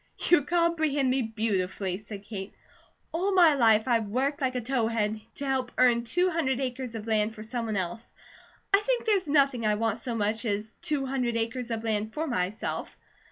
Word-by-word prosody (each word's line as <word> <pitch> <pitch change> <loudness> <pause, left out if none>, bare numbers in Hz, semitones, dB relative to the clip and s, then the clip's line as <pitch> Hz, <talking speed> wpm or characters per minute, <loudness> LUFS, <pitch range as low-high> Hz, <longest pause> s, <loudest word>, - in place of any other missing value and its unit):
"You 350 - +7
comprehend 315 -4 +1
me 265 +1 +2
beautifully," 200 -4 -2
said 205 -1 -9
Kate. 200 -2 -7 0.6
"All 380 +4 0
my 340 -4 +7
life 225 -5 +4
I've 230 -3 +2
worked 275 +7 -1
like 260 -1 0
a - - +1
towhead 225 -3 0
to 285 - -4
help 265 -2 -1
earn 240 -2 +4
two 360 +10 +1
hundred 270 -6 0
acres 255 -2 -4
of 220 -1 -5
land 220 0 +1
for 215 - -8
someone 225 -1 -3
else. 190 +5 -3 0.7
I 395 - +7
think 485 +3 -1
there's 400 -6 +2
nothing 280 -5 +3
I 210 -1 +2
want 225 +1 -1
so 235 0 -4
much 220 +1 0
as 215 0 -2
two 290 -3 -1
hundred 250 -3 -1
acres 230 +2 -3
of 225 -1 -3
land 220 -1 -1
for 315 - -1
myself. 200 - -3
235 Hz, 185 wpm, -28 LUFS, 220-275 Hz, 0.7 s, You